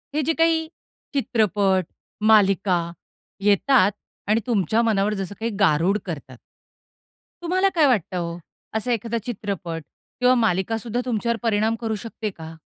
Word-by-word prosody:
हे 310 - +2
जे 325 - +1
काही 325 0 +2 0.5
चित्रपट, 205 -8 +1 0.5
मालिका 195 -4 +4 0.6
येतात 205 +1 +4 0.4
आणि 215 +2 +3
तुमच्या 220 -1 +2
मनावर 210 -2 +1
जसं 195 -1 -4
काही 230 +1 -2
गारुड 185 +1 +3
करतात. 140 -7 -7 1.1
तुम्हाला 370 +3 +2
काय 320 -3 +5
वाटतं 200 -7 +1
ओ, 170 0 -4 0.4
असा 220 +3 -1
एखादा 230 0 -1
चित्रपट 195 -7 -4 0.4
किंवा 250 0 +5
मालिकासुद्धा 225 +2 0
तुमच्यावर 235 -1 -1
परिणाम 220 0 +1
करू 225 -2 -2
शकते 225 -1 -4
का? 160 -4 -10
215 Hz, 130 wpm, -23 LUFS, 190-235 Hz, 1.1 s, काय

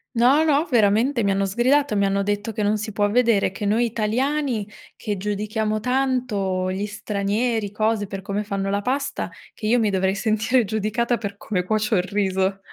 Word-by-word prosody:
No, 260 +7 +5
no, 300 0 +2
veramente 235 +2 +3
mi 200 - +2
hanno 195 0 +1
sgridato, 250 +5 +2
mi 200 -1 +2
hanno 195 0 +1
detto 205 +2 -2
che 215 0 -3
non 210 +1 +2
si 215 +1 -5
può 205 0 +1
vedere, 230 -4 +3
che 200 +2 -5
noi 220 +4 +2
italiani 235 +1 -1 0.3
che 210 -3 -3
giudichiamo 215 +2 -2
tanto 240 -7 0
gli 190 +2 -2
stranieri, 210 +1 -1
cose, 215 0 0
per 195 0 -6
come 200 +2 -3
fanno 195 -1 -3
la 200 0 0
pasta, 275 +5 -2 0.2
che 215 - -5
io 240 +3 +3
mi 220 -2 +2
dovrei 190 0 +1
sentire 220 +4 +1
giudicata 220 +3 0
per 200 -3 -6
come 200 -3 -2
cuocio 215 +3 0
il 180 - +2
riso. 190 0 0
210 Hz, 185 wpm, -23 LUFS, 200-235 Hz, 0.3 s, No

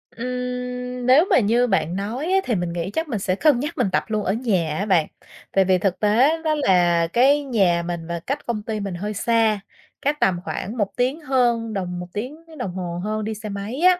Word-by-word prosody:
Ừm, 250 0 -4
nếu 270 +7 +6
mà - - +5
như 235 +3 +2
bạn 185 -5 0
nói 220 +9 -3
á 385 - +4
thì 235 - 0
mình 175 -2 -2
nghĩ 175 +1 -3
chắc 320 +7 -2
mình 225 -7 -2
sẽ 185 -1 0
cân 285 0 +3
nhắc 295 +5 -4
mình - - +2
tập - - +1
luôn 215 -2 -1
ở 190 - 0
nhà 190 -10 0
á 200 - -1
bạn, 175 -6 +3 0.4
tại 195 -1 +3
vì 185 0 +4
thực 185 0 -1
tế 255 +10 +3
đó 310 -1 +1
là 175 - +3
cái 280 +4 +4
nhà 190 -10 +2
mình 170 -1 -4
và 170 0 -3
cách 275 - -4
công 220 -3 -3
ty 215 0 -3
mình 195 -3 -4
hơi 210 +4 -4
xa, 220 -1 +2 0.4
cách 290 +2 0
tầm 180 -2 +2
khoảng 215 +4 -5
1 205 -3 +1
tiếng 260 +6 +1
hơn 240 -5 +1
đồng 180 -2 -3
1 180 - -6
tiếng 250 +8 -4 0.2
đồng 200 -8 -3
hồ 175 -2 -4
hơn 215 +1 -2
đi 220 +1 -3
xe 215 0 -7
máy 200 +6 -5
á. 360 -1 +5
215 Hz, 230 wpm, -22 LUFS, 190-250 Hz, 0.4 s, nếu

